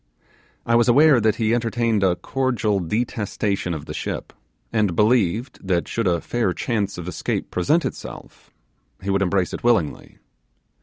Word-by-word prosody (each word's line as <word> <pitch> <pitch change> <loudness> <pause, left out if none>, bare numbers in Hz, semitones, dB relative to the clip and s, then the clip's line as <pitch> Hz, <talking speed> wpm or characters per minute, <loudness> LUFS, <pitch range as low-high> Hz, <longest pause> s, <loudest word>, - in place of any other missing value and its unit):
I 115 - +1
was 120 +1 +4
aware 140 +1 +6
that 110 -1 +2
he 110 -1 +1
entertained 115 -2 +1
a 95 -2 +3
cordial 120 -3 0
detestation 100 -2 -2
of 75 - -7
the - - -6
ship, - - -5 0.4
and 105 -6 +1
believed 110 +3 +1
that, 90 -2 +1
should 115 -3 -1
a 85 -2 +2
fair 115 0 -1
chance 100 -4 -2
of 90 -1 -6
escape 90 - -3
present 150 - +1
itself, - - -8 0.5
he 100 - -1
would 100 0 +1
embrace 95 -1 +1
it - - -6
willingly. 115 -11 0
110 Hz, 155 wpm, -22 LUFS, 95-120 Hz, 0.5 s, aware